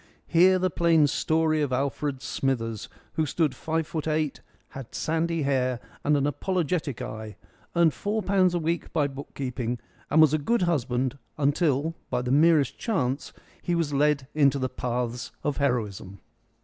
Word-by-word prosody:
Hear 185 +2 +5
the 185 -1 0
plain 165 -3 +4
story 155 +2 +1
of 145 -3 0
Alfred 140 +1 -1
Smithers, 115 -5 -2 0.2
who 160 -1 0
stood 150 -1 +1
five 160 +4 -2
foot 155 0 -4
eight, 155 -2 -1 0.3
had 135 -4 -9
sandy 165 0 0
hair 130 -3 +1 0.2
and 150 0 +3
an 140 - +1
apologetic 155 -1 -1
eye, 110 -2 -7 0.4
earned 170 -2 +4
four 210 +1 -2
pounds 185 -2 +3
a - - +1
week 165 +1 -2
by 150 -3 +2
book 140 0 -7
keeping, 125 -3 -3 0.3
and 155 - +3
was 155 -2 +6
a 155 - +2
good 230 +8 +1
husband 130 -5 0 0.2
until 145 +1 +1 0.2
by 125 - -1
the 125 - -2
merest 150 -1 +4
chance 140 - -1 0.3
he 175 - 0
was 165 -4 0
led 145 -1 +2
into 140 -2 +4
the 130 -1 -1
paths 125 -1 -3
of 145 - -1
heroism. 105 -8 -2
145 Hz, 160 wpm, -26 LUFS, 130-165 Hz, 0.4 s, was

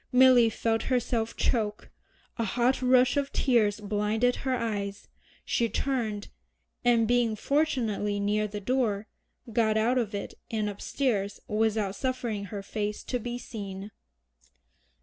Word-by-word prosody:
Milly 250 -2 +7
felt 225 +1 -1
herself 235 -3 0
choke, 215 -4 -1 0.5
a - - +2
hot 245 +5 +1
rush 255 +1 +4
of 280 -1 0
tears 220 -5 +2
blinded 210 +4 +1
her 260 -1 -1
eyes, 205 -4 -3 0.4
she 230 -1 +1
turned, 225 -7 -2 0.5
and 235 -2 +4
being 240 -2 +2
fortunately 225 -7 0
near 210 +1 +1
the 210 0 -5
door, 220 -2 0 0.5
got 220 -1 +3
out 240 +4 +3
of 215 -3 -2
it 200 - -5 0.2
and 215 -2 -1
upstairs 205 -1 -1
without 215 -2 +1
suffering 240 -4 -2
her 200 0 -6
face 210 +1 -3
to 250 - -2
be 240 +1 -4
seen. 200 -4 -7
225 Hz, 130 wpm, -28 LUFS, 210-245 Hz, 0.5 s, Milly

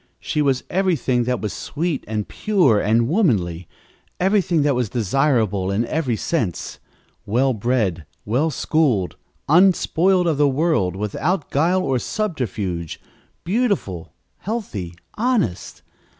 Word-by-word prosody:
She 150 - -1
was 135 -3 +1
everything 155 -10 +1
that 125 0 -1
was 105 -2 -3
sweet 160 -1 -3
and 105 -1 -3
pure 175 - +2
and 115 +3 +2
womanly 100 - +1 0.5
everything 185 -5 +2
that 145 -1 +2
was 125 -4 -1
desirable 110 -4 +1
in 100 +4 0
every 135 -4 -1
sense 110 - -2 0.4
well 130 +5 +1
bred, 105 - -1 0.2
well 130 +10 +1
schooled, 140 - 0 0.3
unspoiled 180 +2 +4
of 160 -4 0
the 145 -1 +4
world, 135 - +1
without 140 - -2
guile 175 +6 +2
or 135 -2 0
subterfuge, 105 - -3 0.4
beautiful, 185 - -1 0.3
healthy, 115 - -4 0.2
honest. 220 - -1
135 Hz, 120 wpm, -21 LUFS, 105-170 Hz, 0.5 s, unspoiled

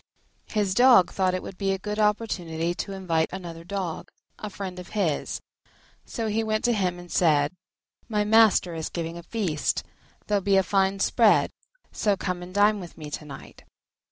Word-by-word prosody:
His 205 -3 0
dog 245 -4 +6
thought 185 -1 +1
it 185 - -4
would 185 - -9
be 195 -1 +1
a - - -2
good 210 +2 -4
opportunity 175 -6 0
to 195 - -5
invite 170 -4 -1
another 170 -3 -7
Dog, 185 -2 -4 0.3
a 210 - -5
friend 185 -2 -6
of 180 - -9
his; 165 -8 -1 0.7
so 230 - -3
he 220 +1 0
went 215 0 -1
to 240 - +3
him 185 -4 0
and 175 0 -11
said, 150 -3 +3 0.6
"My 210 -2 +1
master 215 -4 +4
is 160 -1 -4
giving 165 -1 -4
a - - -8
feast: 170 -5 -1 0.4
there'll 205 -1 +1
be 195 0 +3
a 190 - +4
fine 195 +1 +1
spread, 225 0 +4 0.4
so 205 -2 +1
come 180 -1 -3
and 180 +1 -9
dine 205 +2 +3
with 175 -3 -10
me 150 -2 -8
to 150 - -5
night." 140 -2 -11
190 Hz, 185 wpm, -26 LUFS, 170-210 Hz, 0.7 s, dog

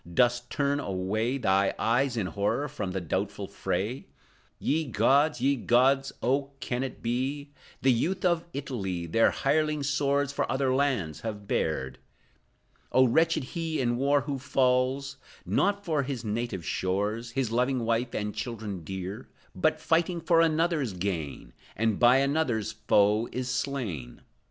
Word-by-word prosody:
Dost 120 +5 +2
turn 145 0 0
away 105 +5 -1
Thy 95 -5 +2
eyes, 120 +2 +1
in 105 - 0
horror, 100 - -1
from 100 -8 -4
the 95 - -2
doubtful 85 -4 -3
fray? 115 +7 -3 0.5
Ye 160 +2 0
gods, 135 +4 +2
ye 140 +2 +3
gods. 135 +3 +3
Oh, 140 +2 0
can 125 -3 -2
it 130 -2 -5
be? 135 +5 -2 0.3
The 135 - +5
youth 180 +11 0
of 170 -2 +2
Italy 100 - -4
Their 115 +8 +3
hireling 150 +1 0
swords 140 0 +1
for - - -1
other 130 -1 +1
lands 130 - 0
have 105 -3 -6
bared! 65 -5 -1 0.9
Oh, 130 - +5
wretched 160 +4 +2
he 165 -2 -2
in 120 -2 +1
war 140 +3 +2
who 140 -1 -4
falls, 135 +1 +1 0.3
Not 200 0 +1
for 155 -5 +1
his 130 -4 -4
native 105 -5 -3
shores, 105 +5 -1
His 130 -3 -1
loving 125 0 +1
wife 115 +2 0
and 105 0 -2
children 105 -4 -5
dear, 95 -3 -6 0.3
But, - - +1
fighting 170 +1 +1
for 165 0 +3
another's 160 - +1
gain, 85 -6 -4 0.2
And 110 -2 0
by 120 +1 +6
another's 135 -6 +1
foe 105 0 +2
is 125 0 -3
slain! 115 - -3
125 Hz, 145 wpm, -28 LUFS, 105-140 Hz, 0.9 s, by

